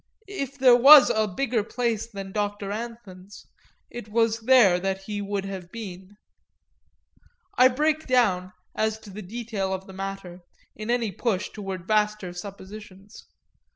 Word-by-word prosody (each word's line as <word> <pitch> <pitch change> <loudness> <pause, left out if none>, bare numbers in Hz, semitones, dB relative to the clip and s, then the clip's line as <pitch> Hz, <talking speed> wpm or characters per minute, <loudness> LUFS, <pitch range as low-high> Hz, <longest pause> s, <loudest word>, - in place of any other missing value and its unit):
If 280 - -6
there 255 -2 +6
was 275 +3 +9
a 220 -1 +1
bigger 230 +2 -1
place 230 -1 -2
than 195 -3 -8
Doctor 205 -1 -3
Anthon's 205 -4 -9 0.5
it 240 -3 -8
was 225 0 +1
there 225 -7 +4
he 205 +2 -6
would 200 -1 -3
have 190 -3 -7
been. 195 -3 -9 1.4
I 255 - +7
break 305 +4 0
down, 200 -8 +1 0.2
as 220 0 -1
to 205 - -12
the 210 +3 -8
detail 210 -1 -4
of 190 0 -4
the 190 - -12
matter, 195 -2 -7 0.4
in 215 +2 -7
any 235 -3 0
push 195 0 -2
toward 190 -3 -7
vaster 210 -4 0
suppositions. 200 +2 -11
210 Hz, 140 wpm, -25 LUFS, 195-235 Hz, 1.4 s, was